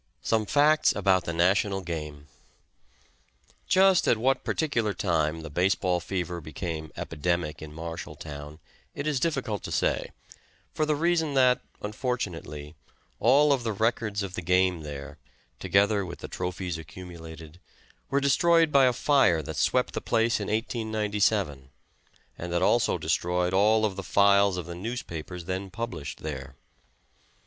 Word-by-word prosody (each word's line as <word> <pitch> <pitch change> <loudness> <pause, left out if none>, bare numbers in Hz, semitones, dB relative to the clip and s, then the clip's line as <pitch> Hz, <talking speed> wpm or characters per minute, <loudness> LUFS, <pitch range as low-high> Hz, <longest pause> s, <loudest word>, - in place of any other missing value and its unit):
SOME 110 -2 +1
FACTS 150 +4 +4
ABOUT 95 -3 +2
THE 85 - -3
NATIONAL 95 +3 +2
GAME. 75 -4 -6 1.4
Just 190 -1 +4
at - - +4
what 130 +4 +1
particular 115 -10 0
time 80 -3 0
the 80 - -7
base 90 +5 +2
ball 90 -2 0
fever 90 -1 -4
became 80 +1 -5
epidemic 85 0 -2
in 80 -1 -8
Marshalltown 75 -2 -7 0.4
it 145 - -4
is 150 -3 0
difficult 130 -8 -1
to - - -7
say, - - 0 0.6
for 155 - 0
the 155 - +2
reason 160 -2 +1
that, 130 -1 +4 0.2
unfortunately, 95 - -4 0.5
all 140 +6 +5
of 135 - 0
the 110 -2 -1
records 105 -1 0
of 95 -2 -6
the 90 - -4
game 90 0 +2
there, 75 0 -8 0.4
together 100 +1 +2
with 90 -2 -7
the - - -8
trophies 90 -2 -4
accumulated, 80 -1 -10 0.5
were 140 - +2
destroyed 165 +4 +4
by 140 -2 +6
a 125 - +3
fire 120 - +3
that - - -6
swept - - +1
the - - -3
place 115 0 +1
in 105 - -4
1897, 105 - -1 0.7
and 90 0 -5
that 85 - +1
also - - +3
destroyed 90 +1 0
all 110 +3 +4
of 100 -3 -2
the - - -3
files 100 0 +4
of 90 - -4
the 85 - -7
newspapers 90 -4 -6
then 95 +2 -3
published 95 -8 -6
there. 70 -3 -6
95 Hz, 145 wpm, -27 LUFS, 80-115 Hz, 1.4 s, by